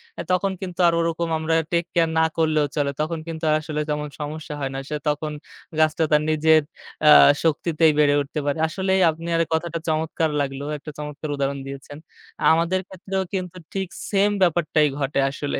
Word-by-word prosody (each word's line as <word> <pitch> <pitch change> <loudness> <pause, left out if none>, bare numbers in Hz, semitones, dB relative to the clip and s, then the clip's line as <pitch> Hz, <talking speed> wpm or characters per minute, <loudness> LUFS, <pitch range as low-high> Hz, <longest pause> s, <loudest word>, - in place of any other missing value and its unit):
অ্যা - - -5
তখন 195 +2 +1
কিন্তু 180 -2 -7
আর 170 - +3
ওরকম 165 0 -1
আমরা 160 +1 0 0.2
টেক 170 0 +1
কেয়ার 165 -1 +2
না 160 - +4
করলেও 155 -2 +2
চলে। 145 -2 0
তখন 160 +1 -2
কিন্তু 165 0 -6
আর 155 - +4
আসলে 150 0 -3
তেমন 150 0 -2
সমস্যা 150 0 -5
হয় 135 -1 -3
না। - - -2
সে 150 - -2
তখন 150 +1 -2 0.5
গাছটা 155 +1 +3
তার 150 0 +5
নিজের 155 0 +4 0.4
অ্যা 150 - +8 0.3
শক্তিতেই 160 0 +2
বেড়ে 145 -1 +4
উঠতে 145 +2 -4
পারে। 145 +2 0
আসলেই 190 +3 0
আপনার 165 +1 -1
কথাটা 165 +1 -1
চমৎকার 160 0 0
লাগলো। 135 0 -4
একটা 150 +1 -9
চমৎকার 150 +1 -6
উদাহরণ 140 0 -2
দিয়েছেন। 140 +1 -9 0.6
আমাদের 170 +3 +1
ক্ষেত্রেও 190 0 -4
কিন্তু 185 -2 -4 0.2
ঠিক 195 -1 -2 0.2
same 205 +1 +3
ব্যাপারটাই 160 -3 +3
ঘটে 140 0 0
আসলে। 145 0 -3
160 Hz, 175 wpm, -23 LUFS, 150-170 Hz, 0.6 s, অ্যা